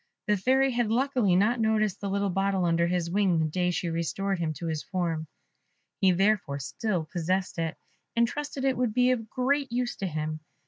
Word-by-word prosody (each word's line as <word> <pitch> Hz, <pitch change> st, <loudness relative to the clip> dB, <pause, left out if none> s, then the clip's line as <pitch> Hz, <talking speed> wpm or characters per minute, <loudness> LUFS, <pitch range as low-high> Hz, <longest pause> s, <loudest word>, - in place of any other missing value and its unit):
The 210 Hz, -, +3 dB
Fairy 260 Hz, +7 st, +3 dB
had 240 Hz, -2 st, 0 dB
luckily 245 Hz, -5 st, +2 dB
not 215 Hz, +6 st, +3 dB
noticed 215 Hz, -3 st, +1 dB
the 200 Hz, -, -2 dB
little 200 Hz, 0 st, 0 dB
bottle 195 Hz, 0 st, +1 dB
under 170 Hz, 0 st, +2 dB
his 175 Hz, -1 st, -1 dB
wing 190 Hz, -3 st, +2 dB
the 160 Hz, -, +2 dB
day 180 Hz, +3 st, 0 dB
she 175 Hz, 0 st, -1 dB
restored 170 Hz, +4 st, -1 dB
him 165 Hz, -2 st, 0 dB
to 170 Hz, -, -7 dB
his 160 Hz, -2 st, -2 dB
form; 170 Hz, -4 st, -2 dB, 0.7 s
he 190 Hz, -, +4 dB
therefore 190 Hz, -6 st, +1 dB
still 180 Hz, -, -2 dB
possessed 180 Hz, +2 st, -2 dB
it, 165 Hz, -1 st, -2 dB, 0.4 s
and 235 Hz, 0 st, +4 dB
trusted 285 Hz, +1 st, -4 dB
it 265 Hz, -1 st, +2 dB
would 240 Hz, -3 st, 0 dB
be 250 Hz, 0 st, +4 dB
of 225 Hz, -4 st, -2 dB
great 275 Hz, +1 st, 0 dB
use 245 Hz, 0 st, -1 dB
to 195 Hz, -, -2 dB
him. 155 Hz, -1 st, -3 dB
195 Hz, 195 wpm, -28 LUFS, 170-235 Hz, 0.7 s, he